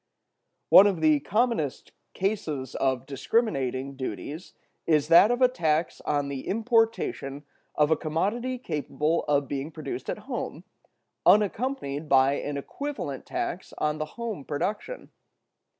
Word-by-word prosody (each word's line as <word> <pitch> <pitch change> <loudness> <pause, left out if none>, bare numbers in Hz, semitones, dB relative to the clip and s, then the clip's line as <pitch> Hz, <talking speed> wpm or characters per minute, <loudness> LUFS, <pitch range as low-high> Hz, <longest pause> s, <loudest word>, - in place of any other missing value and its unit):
One 200 - +9
of 190 -5 0
the 155 -2 +4
commonest 215 - -1 0.2
cases 155 - -2
of 130 -1 0
discriminating 135 - -1
duties 135 - -6 0.3
is 155 -2 +2
that 170 +5 +8
of 245 +1 +2
a - - +8
tax 160 -9 0
on 145 -1 0
the 140 -2 -5
importation 225 - 0 0.3
of 150 +1 +3
a - - +6
commodity 205 +12 -1
capable 155 - -1
of 145 -1 +1
being 140 +1 -3
produced 165 - -6
at - - -2
home, - - -5 0.6
unaccompanied 205 - +2
by 135 0 +5
an 145 0 -3
equivalent 145 - -5
tax 180 - -4
on 150 0 -1
the 155 - -1
home 225 -10 -4
production. 205 - -4
155 Hz, 130 wpm, -27 LUFS, 140-215 Hz, 0.6 s, One